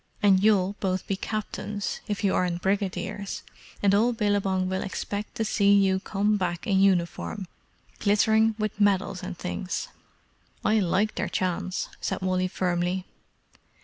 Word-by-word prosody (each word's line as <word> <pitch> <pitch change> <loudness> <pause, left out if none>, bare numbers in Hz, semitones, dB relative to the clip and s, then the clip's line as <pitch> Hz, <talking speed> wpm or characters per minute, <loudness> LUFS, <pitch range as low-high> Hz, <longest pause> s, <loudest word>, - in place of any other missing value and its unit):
And 195 -2 +5
you'll 200 -2 +3
both 185 -1 -1
be 195 - -1
captains, 210 -1 -4
if 205 0 -3
you 195 - +3
aren't 175 -1 0
brigadiers, 200 0 -2 0.4
and 200 -1 +4
all 230 +4 +4
Billabong 200 -4 +1
will 190 0 -1
expect 205 +3 -4
to 225 -2 -1
see 200 -1 +3
you 190 -1 +3
come 205 +2 0
back 175 -3 -2
in 195 -2 +2
uniform 190 +1 +1 0.5
glittering 220 +2 +3
with 215 -1 -3
medals 195 -2 +2
and 185 -1 -6
things." 180 +1 -4 0.8
"I 215 +1 +4
like 200 +3 +1
their - - -2
chance!" 185 0 -1
said - - -2
Wally 185 0 +1
firmly. 180 0 -1
195 Hz, 145 wpm, -26 LUFS, 185-205 Hz, 0.8 s, And